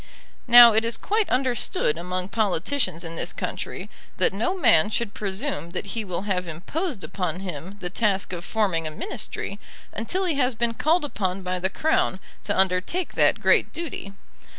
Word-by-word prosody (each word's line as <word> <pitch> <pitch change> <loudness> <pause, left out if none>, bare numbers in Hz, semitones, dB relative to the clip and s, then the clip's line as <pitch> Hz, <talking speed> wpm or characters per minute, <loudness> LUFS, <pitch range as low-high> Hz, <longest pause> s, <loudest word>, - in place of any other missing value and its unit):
Now 240 -1 +10
it 220 +1 +3
is 230 0 0
quite 430 0 0
understood 250 - 0
among 180 +2 -4
politicians 195 - -1
in 165 0 -5
this - - -2
country - - -5 0.3
that - - +2
no 235 - -1
man 220 - +5
should 220 -1 -2
presume 195 - -3
that 200 - -4
he 225 - -2
will 180 -2 -4
have 185 -3 -1
imposed 205 - -4
upon 180 -2 -3
him 185 +1 -7
the 180 - -3
task 200 -3 0
of 175 -1 -5
forming 180 -6 0
a - - -2
Ministry 200 +3 -5 0.3
until 360 - -2
he 325 -6 0
has 250 -2 +2
been 235 0 0
called 315 +6 +2
upon 190 -8 -3
by 185 0 -2
the 190 +1 +1
Crown 215 -5 +1 0.3
to - - -1
undertake 190 - +1
that - - +3
great - - +3
duty. 290 -12 -6
200 Hz, 175 wpm, -24 LUFS, 180-245 Hz, 0.3 s, Now